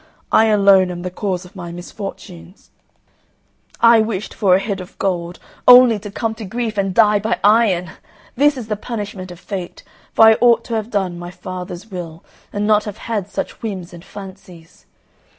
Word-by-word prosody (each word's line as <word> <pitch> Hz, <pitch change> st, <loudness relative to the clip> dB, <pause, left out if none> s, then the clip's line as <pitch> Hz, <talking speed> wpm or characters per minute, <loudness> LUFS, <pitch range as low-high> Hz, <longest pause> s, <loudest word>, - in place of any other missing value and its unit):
I 220 Hz, -, +5 dB
alone 200 Hz, -3 st, +4 dB
am 175 Hz, -1 st, -6 dB
the 180 Hz, -, -4 dB
cause 185 Hz, -1 st, -3 dB
of 180 Hz, -, -16 dB
my 175 Hz, -2 st, -7 dB
misfortunes. 180 Hz, 0 st, -10 dB, 1.1 s
I 230 Hz, -1 st, +7 dB
wished 215 Hz, -2 st, -3 dB
for 195 Hz, -4 st, +3 dB
a -, -, +3 dB
head 195 Hz, -1 st, -4 dB
of 180 Hz, -, -13 dB
gold, 175 Hz, -2 st, -2 dB, 0.3 s
only 245 Hz, -3 st, +8 dB
to 205 Hz, +1 st, -8 dB
come 220 Hz, +2 st, -3 dB
to -, -, -4 dB
grief 225 Hz, +2 st, -3 dB
and 195 Hz, -1 st, 0 dB
die 210 Hz, +1 st, +4 dB
by 220 Hz, +3 st, -1 dB
iron! 200 Hz, -5 st, +3 dB, 0.4 s
This 290 Hz, +2 st, +3 dB
is 235 Hz, -4 st, -6 dB
the 215 Hz, -, -1 dB
punishment 205 Hz, -4 st, -6 dB
of 175 Hz, -1 st, -11 dB
Fate, 185 Hz, -3 st, -7 dB, 0.3 s
for 225 Hz, -, +6 dB
I 220 Hz, 0 st, +7 dB
ought 240 Hz, -1 st, +5 dB
to 235 Hz, -, -6 dB
have 220 Hz, 0 st, -2 dB
done 190 Hz, -5 st, -2 dB
my 175 Hz, 0 st, -7 dB
father's 185 Hz, +2 st, -8 dB
will, 170 Hz, -3 st, -7 dB, 0.3 s
and 205 Hz, 0 st, -2 dB
not 210 Hz, 0 st, +3 dB
have 210 Hz, -2 st, -6 dB
had 210 Hz, -4 st, -4 dB
such 195 Hz, -, -5 dB
whims 190 Hz, -6 st, -6 dB
and 170 Hz, 0 st, -11 dB
fancies. 190 Hz, -5 st, -13 dB
200 Hz, 185 wpm, -19 LUFS, 180-220 Hz, 1.1 s, only